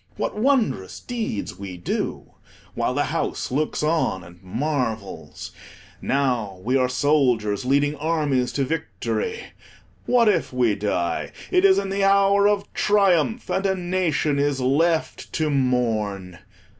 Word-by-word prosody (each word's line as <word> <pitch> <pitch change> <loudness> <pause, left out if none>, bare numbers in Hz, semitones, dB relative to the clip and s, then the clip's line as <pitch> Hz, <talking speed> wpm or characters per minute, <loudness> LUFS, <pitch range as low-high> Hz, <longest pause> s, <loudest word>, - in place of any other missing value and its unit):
What - - -2
wondrous 220 - 0
deeds 225 - -4
we 95 -3 -7
do, 85 - -3 0.4
while - - -1
the - - +2
house - - -2
looks 150 +3 -1
on 155 - 0
and 85 +1 -15
marvels. 115 -1 -4 0.5
Now 125 -9 -1
we 125 +5 0
are 130 -1 +2
soldiers, 125 -5 +1
leading 145 +3 +2
armies 145 -5 0
to 140 - 0
victory. 445 - -3 0.7
What 240 -2 +4
if 210 - +2
we 125 -4 +2
die: 90 -5 -2 0.2
it 365 0 +3
is 385 -1 +6
in 195 - -1
the 195 0 0
hour 200 +1 +4
of 205 -1 -1
triumph, 205 +1 +2
and 190 - 0
a 190 - +1
nation 175 -5 0
is 140 -1 +1
left 155 +6 0
to 155 -2 0
mourn. 110 -9 -1
145 Hz, 135 wpm, -23 LUFS, 115-190 Hz, 0.7 s, is